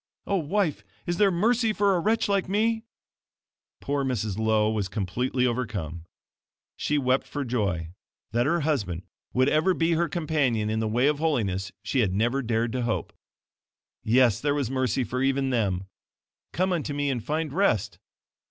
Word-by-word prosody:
Oh, 200 - +1
Wife, 165 - 0 0.2
is 175 0 -1
there 205 0 +5
mercy 220 +5 +2
for 200 -1 +3
a 180 - +2
wretch 220 +6 +1
like 200 -2 0
me?" 225 +3 +1 1.0
Poor 140 0 -1
Mrs. 110 -7 -1
Lowe 110 0 +2
was 105 -3 -1
completely 115 +6 -1
overcome. 105 -10 -3 0.7
She 150 - 0
wept 130 -1 +1
for 145 -1 -4
joy. 100 -9 -1 0.4
That 120 +3 +1
her 170 +3 +2
husband 100 - -1 0.3
would 130 +1 +2
ever 160 +5 +3
be 165 +1 +1
her 170 0 +1
companion 140 -10 0
in 110 - 0
the 110 - 0
way 120 +4 +2
of 145 0 +2
holiness, 100 - 0
she 135 - 0
had 95 -6 +2
never 120 +6 +1
dared 115 -1 0
to 125 +1 -2
hope. 120 -1 -2 0.9
Yes, 120 -1 +3
there 145 0 +1
was 135 -4 -1
mercy 130 -1 0
for 125 +3 -3
even 135 0 +1
them. 100 -7 0 0.7
"Come 185 +1 +1
unto 150 -4 -2
me, 145 -1 0
and 120 -4 -3
find 155 +2 -2
rest." 190 - +1
130 Hz, 170 wpm, -26 LUFS, 110-160 Hz, 1.0 s, there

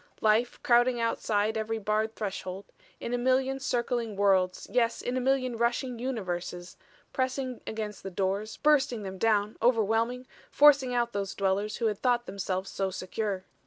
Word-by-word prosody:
"Life 220 +3 +2
crowding 240 0 +4
outside 220 -2 0
every 220 +1 -2
barred 215 +1 -1
threshold 195 -2 -5 0.3
in 240 - -4
a 245 - 0
million 260 +2 +1
circling 240 -5 -1
worlds, 190 -2 +2
yes, 235 -2 +1
in 245 - -3
a 255 - 0
million 255 -1 +1
rushing 240 +1 -1
universes; 180 -7 -4 0.4
pressing 260 -1 -2
against 215 -2 -5
the 195 - -6
doors, 195 +3 -2
bursting 290 -7 +2
them 190 -1 -7
down, 210 -1 +1
overwhelming, 230 +1 +2 0.2
forcing 285 -3 +5
out 240 0 0
those 200 -1 -3
dwellers 200 +2 0
who 235 - -1
had 210 -2 0
thought 245 -1 +1
themselves 190 -1 -3
so 195 -1 -1
secure. 190 +1 -3
225 Hz, 155 wpm, -28 LUFS, 200-245 Hz, 0.4 s, forcing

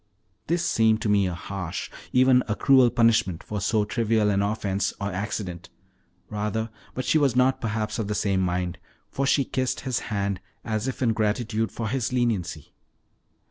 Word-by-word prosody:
This 170 +1 +1
seemed 110 -1 +3
to 110 - 0
me 100 -2 +3
a 90 - -3
harsh, 90 -1 -5 0.2
even 130 0 +5
a 105 - 0
cruel 130 -1 +5
punishment 115 -8 +2
for 105 -1 -4
so 105 +2 +1
trivial 110 -1 +1
an 100 0 +2
offense, 100 -2 -1
or 100 0 -2
accident, 90 -2 -4 0.6
rather; 105 +1 -2 0.2
but 130 - -3
she 155 +5 +3
was 135 -5 +2
not 130 +1 +3
perhaps 110 0 -2
of 110 - -1
the 105 - -2
same 100 -2 +1
mind, 90 -1 -1 0.3
for 135 0 -1
she 140 -1 +3
kissed 130 -1 -1
his 130 -3 -1
hand, 100 -2 -1 0.2
as 110 +1 -2
if 130 0 -3
in 115 -2 +3
gratitude 110 +1 0
for 115 - -4
his 125 +1 -1
leniency. 105 - -1
110 Hz, 175 wpm, -25 LUFS, 100-120 Hz, 0.6 s, even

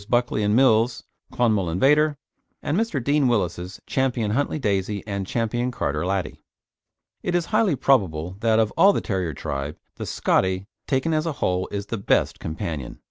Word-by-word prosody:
Buckley 120 -3 +1
and 105 +1 +2
Mills's 120 -2 +3 0.3
Clonmel 110 -7 +1
Invader, 145 - +3 0.5
and 145 - -1
Mr. 195 - 0
Deane 145 +1 +2
Willis's 90 -5 -1
Ch. - - -8
Huntley 130 +2 0
Daisy 100 -5 -1
and 100 -2 -4
Ch. - - -9 0.4
Carter 75 -8 -2
Laddie. 95 -2 -2 0.8
It 175 - -1
is 175 -1 +1
highly 215 -5 +2
probable 90 - +1
that 110 0 +2
of 110 -2 +2
all 195 +4 +6
the - - -1
terrier 90 - -2
tribe, 70 +3 -4 0.2
the - - -5
"Scottie," 95 0 +1 0.2
taken 140 +4 +1
as 155 +1 0
a 160 - -1
whole, 90 -7 -1
is 100 0 -4
the 115 0 -4
best 100 - +1
companion. 80 - -5
110 Hz, 165 wpm, -24 LUFS, 95-140 Hz, 0.8 s, all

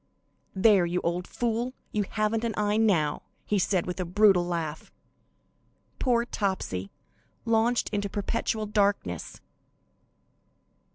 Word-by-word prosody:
"There, 190 -2 +5
you 175 +1 0
old 175 +1 -2
fool, 240 +1 -2 0.2
you 210 -2 0
haven't 215 +1 0
any 230 -3 -1
eye 210 0 +1
now!" 175 -10 +2 0.2
he 210 - +1
said, 185 -1 +1
with 180 +1 -5
a - - 0
brutal 190 0 +4
laugh. 165 -3 -4 1.1
Poor 240 -2 +2
Topsy, 190 - -2 0.6
launched 230 +1 +2
into 205 -1 -1
perpetual 215 +2 -2
darkness! 200 - -1
205 Hz, 115 wpm, -27 LUFS, 175-220 Hz, 1.1 s, There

